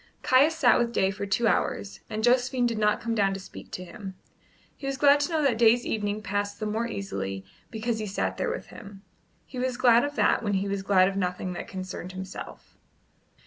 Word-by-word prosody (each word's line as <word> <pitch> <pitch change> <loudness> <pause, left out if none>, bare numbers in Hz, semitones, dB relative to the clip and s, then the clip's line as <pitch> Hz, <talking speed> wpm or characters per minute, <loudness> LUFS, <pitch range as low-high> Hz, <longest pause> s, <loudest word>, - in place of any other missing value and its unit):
Caius 285 +5 +4
sat 265 -6 +4
with 235 -1 0
Day 190 -4 +2
for 200 +1 -5
two 225 +4 +1
hours, 200 -1 -1
and 215 0 -3
Josephine 250 +1 +3
did 230 -2 -1
not 210 0 +2
come 230 0 -2
down 195 -3 +1
to - - -5
speak 190 - -11
to 180 - -5
him. 190 +1 -9 0.6
He 275 - -7
was 275 0 -2
glad 285 0 +5
to 290 +4 -1
know 315 -2 +1
that 245 -5 +2
Day's 235 +1 +5
evening 210 -1 -2
passed 205 0 -2
the 215 - -3
more 220 +2 -1
easily 95 - -5 0.2
because 225 0 -2
he 215 - -3
sat 195 - -2
there - - -1
with 475 - -4
him; 200 -3 -12 0.4
he 255 - -8
was 255 -1 -1
glad 240 -2 +5
of 290 0 -3
that - - +3
when 205 -3 -1
he 195 +1 0
was 200 0 -2
glad 190 -1 +4
of 195 0 -3
nothing 180 -1 -2
that - - -6
concerned 185 -1 -7
himself. 190 0 -9
215 Hz, 220 wpm, -27 LUFS, 195-245 Hz, 0.6 s, glad